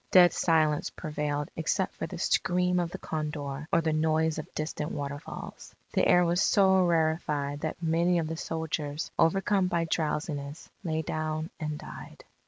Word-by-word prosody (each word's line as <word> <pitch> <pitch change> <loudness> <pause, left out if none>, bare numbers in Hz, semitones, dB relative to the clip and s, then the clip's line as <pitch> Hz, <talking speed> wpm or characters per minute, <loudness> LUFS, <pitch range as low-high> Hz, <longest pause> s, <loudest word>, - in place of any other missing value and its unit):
Dead 180 -1 +7
silence 155 -3 +2
prevailed 150 -1 -3
except 185 +4 0
for - - -4
the 180 - -7
scream 180 +1 +2
of 175 -1 0
the - - -6
condor 150 -2 -4
or 170 - +4
the 160 -1 0
noise 160 0 +1
of 155 - -8
distant 155 -1 -3
waterfalls. 145 0 -6 0.2
The - - +3
air 180 0 +5
was 175 +2 +2
so 190 -2 +5
rarefied 155 -3 0
that 155 +2 -4
many 170 +2 +2
of 165 - 0
the 160 +1 -3
soldiers, 160 -2 -3
overcome 195 +3 +3
by 170 -2 0
drowsiness, 150 -2 -3
lay 160 -2 -1
down 155 +1 -3
and 150 -1 -3
died. - - -10
160 Hz, 160 wpm, -29 LUFS, 150-170 Hz, 0.2 s, Dead